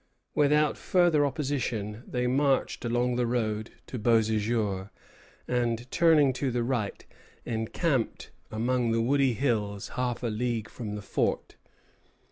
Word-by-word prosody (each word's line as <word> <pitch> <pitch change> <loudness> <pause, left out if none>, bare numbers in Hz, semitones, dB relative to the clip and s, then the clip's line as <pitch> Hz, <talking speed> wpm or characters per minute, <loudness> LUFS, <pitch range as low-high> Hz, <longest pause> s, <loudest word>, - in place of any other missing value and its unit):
Without 150 +1 +3
further 175 -5 +3
opposition, 125 -8 -2
they 125 0 -1
marched 135 +2 +1
along 120 +1 0
the 120 -1 +1
road 110 -2 -1 0.2
to 125 - -6
Beauséjour, 110 -3 +1 0.6
and, 120 -1 -1
turning 160 -6 +5
to 135 +1 -1
the 120 -1 0
right, 120 -5 -2 0.4
encamped 120 +3 -1 0.2
among 120 +2 0
the 115 - +2
woody 135 0 +3
hills 105 -5 -1
half 125 -1 -2
a 120 - 0
league 115 0 -2
from 105 -4 -6
the 105 - -6
fort. - - -1
120 Hz, 125 wpm, -28 LUFS, 110-135 Hz, 0.6 s, turning